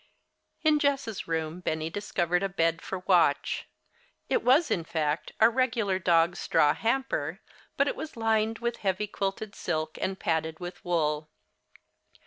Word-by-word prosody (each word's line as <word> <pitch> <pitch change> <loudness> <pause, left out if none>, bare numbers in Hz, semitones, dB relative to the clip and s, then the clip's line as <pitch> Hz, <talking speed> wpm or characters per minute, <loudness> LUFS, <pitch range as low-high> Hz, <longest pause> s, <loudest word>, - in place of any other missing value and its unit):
In 310 -1 +4
Jess' 275 -7 -1
room 160 +1 -2
Benny 160 -2 -2
discovered 180 -3 0
a 195 - 0
bed 165 -2 +1
for 185 -1 -5
Watch. 170 -6 +2 0.6
It 475 - +2
was, 290 +6 +4
in 170 - +1
fact, 155 -1 -2
a 220 - +8
regular 230 -6 +1
dog's 170 -1 +3
straw 150 0 +3
hamper, 260 +8 -1 0.4
but - - +3
it - - -1
was 315 - -7
lined 225 0 +1
with 235 0 -2
heavy 195 +1 -1
quilted 200 +1 -3
silk 155 -3 -3
and 190 0 -2
padded 160 -1 -1
with 175 0 -8
wool. 155 -3 0
185 Hz, 145 wpm, -28 LUFS, 165-225 Hz, 0.6 s, a